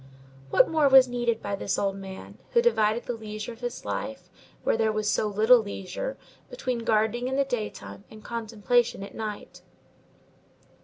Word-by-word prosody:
What - - +5
more 310 -3 +3
was 265 -1 +8
needed 240 -2 -1
by 205 0 -2
this 195 0 -2
old 195 -1 0
man, 190 -1 -9
who 470 - +5
divided 220 - +2
the 245 - -3
leisure 215 0 -6
of 230 - -16
his 245 -1 -5
life, 270 0 -5 0.3
where - - +2
there 220 -1 +2
was 215 -1 -2
so 215 - +1
little 220 +4 +5
leisure, 210 - -5 0.3
between 255 - -3
gardening 225 +2 +1
in 265 - -1
the 275 0 +2
daytime 210 - -5
and 215 -1 -13
contemplation 230 -1 0
at 200 - -9
night? 215 -2 -6
225 Hz, 165 wpm, -27 LUFS, 210-245 Hz, 0.3 s, was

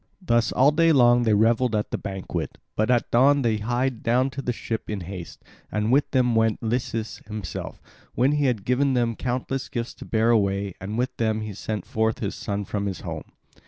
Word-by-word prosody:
Thus 120 - +1
all 135 +3 +5
day 165 +2 +4
long 120 -4 +5
they 110 -2 +4
revelled 115 +2 +3
at 105 - -1
the - - -1
banquet. 95 -2 -5 0.2
But 110 +2 +1
at 120 -2 +2
dawn 140 +3 +5
they 115 -2 +2
hied 120 +3 -1
down 125 +3 +2
to 140 - -5
the 125 - -1
ship 115 -1 -4
in 105 -3 -3
haste; 90 -1 -8 0.3
and 105 +2 0
with 140 +2 +3
them 125 -2 +2
went 110 0 +1
Lycus 115 -1 -2
himself, 105 -4 -6 0.4
when 130 +4 +3
he 150 -1 +1
had 120 -7 0
given 130 +2 +2
them 120 -2 +1
countless 130 +2 -3
gifts 120 -4 -4
to - - -11
bear 115 +1 +2
away; 100 -3 +1
and 105 +4 -4
with 125 +1 -1
them 110 -1 0
he 110 -1 -5
sent 105 +2 -4
forth 110 0 0
his 100 -3 -3
son 100 -1 -3
from 100 0 -2
his 95 -3 -4
home. - - -6
115 Hz, 205 wpm, -25 LUFS, 105-125 Hz, 0.4 s, all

